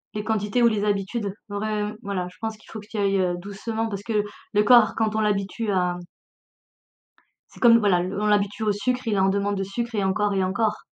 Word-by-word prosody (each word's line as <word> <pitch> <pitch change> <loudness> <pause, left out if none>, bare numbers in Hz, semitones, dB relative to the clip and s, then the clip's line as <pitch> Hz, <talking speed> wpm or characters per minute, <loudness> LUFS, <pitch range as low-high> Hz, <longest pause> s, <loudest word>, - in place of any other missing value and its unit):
Les 210 - -2
quantités, 215 +2 0
ou - - +7
les 210 -2 0
habitudes, 205 +1 -1 0.2
vraim 210 0 -2
voilà, 195 -4 -3
je - - -20
pense 220 -1 -3
qu'il 220 - -20
faut 220 - -6
que 205 - -13
tu 225 - -6
y - - 0
ailles, 195 -1 +2
heu, 180 -1 0
doucement 220 +4 -4
parce 200 -2 -5
que 215 -2 0 0.3
le 210 0 +4
corps 230 -1 +6
quand 220 -1 0
on 220 - +1
l'habitue 210 +1 -1
à 180 -2 0 1.6
C'est - - -15
comme, 230 -1 +7
voilà 200 -5 +3
l 180 +1 -3
on 210 +1 0
l'habitue 205 +1 +1
au 215 - +2
sucre, 250 +5 -1
il 215 - +1
est - - +1
en 190 - +4
demande 200 +1 0
de 195 - -1
sucre 235 +5 -4
et 205 - 0
encore 205 +1 +1
et 195 - +1
encore. 210 +4 -1
210 Hz, 235 wpm, -24 LUFS, 195-220 Hz, 1.6 s, ou